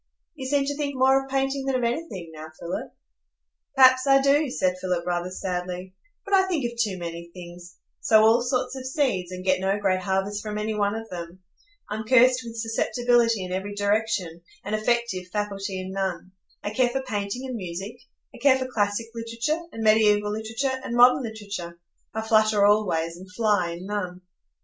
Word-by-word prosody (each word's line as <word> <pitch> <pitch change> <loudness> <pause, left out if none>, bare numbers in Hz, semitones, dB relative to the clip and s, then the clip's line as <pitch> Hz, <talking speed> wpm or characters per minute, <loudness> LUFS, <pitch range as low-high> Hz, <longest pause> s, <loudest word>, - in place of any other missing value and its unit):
"You 265 -5 -6
seem 280 0 +2
to 285 +1 -2
think 285 -1 -3
more 265 +1 +4
of 270 - -13
painting 270 0 -1
than 270 - +1
of 250 - 0
anything 235 - -3
now, 155 0 -8
Philip?" 170 - -5 0.8
"Perhaps 260 0 +6
I 275 0 +6
do," 280 +2 +3
said 185 -7 0
Philip, 180 -2 -1
rather 175 0 -1
sadly; 180 0 -4 0.3
"but 400 - -5
I 380 -1 +5
think 325 -9 -1
of 235 0 -3
too 210 -5 0
many 170 -1 -6
things,—sow 175 +4 -1
all 225 +2 +5
sorts 250 +1 -1
of 260 -1 -6
seeds, 250 - 0
and 185 0 -7
get 185 -1 +3
no 195 +2 0
great 190 -2 +1
harvest 195 +2 -1
from 210 -1 -5
any 215 +1 -2
one 205 0 0
of 225 0 -6
them. 175 +1 -8 0.4
I'm 215 +1 -4
cursed 255 +2 +5
with 230 -1 -8
susceptibility 230 -1 +1
in 180 - -7
every 195 +2 -3
direction, 205 -5 -1 0.2
and 205 - -4
effective 215 -4 0
faculty 200 -2 -3
in 185 0 -6
none. 190 -2 -3 0.3
I 205 - -3
care 255 0 +2
for 265 +2 -3
painting 215 +1 -3
and 255 -1 -4
music; 190 +3 -6 0.4
I - - -12
care 265 +1 +5
for 260 - -3
classic 210 -3 -1
literature, 230 +8 -2
and 225 -4 -5
mediæval 210 -1 +4
literature, 225 +5 -2
and 235 - -4
modern 245 +2 +6
literature; 200 -7 -6 0.4
I 220 - -1
flutter 215 -2 +4
all 210 0 +4
ways, 165 0 -2
and 185 +1 -12
fly 205 -4 +1
in 175 +2 -8
none." 185 -3 -4
215 Hz, 190 wpm, -25 LUFS, 185-250 Hz, 0.8 s, Perhaps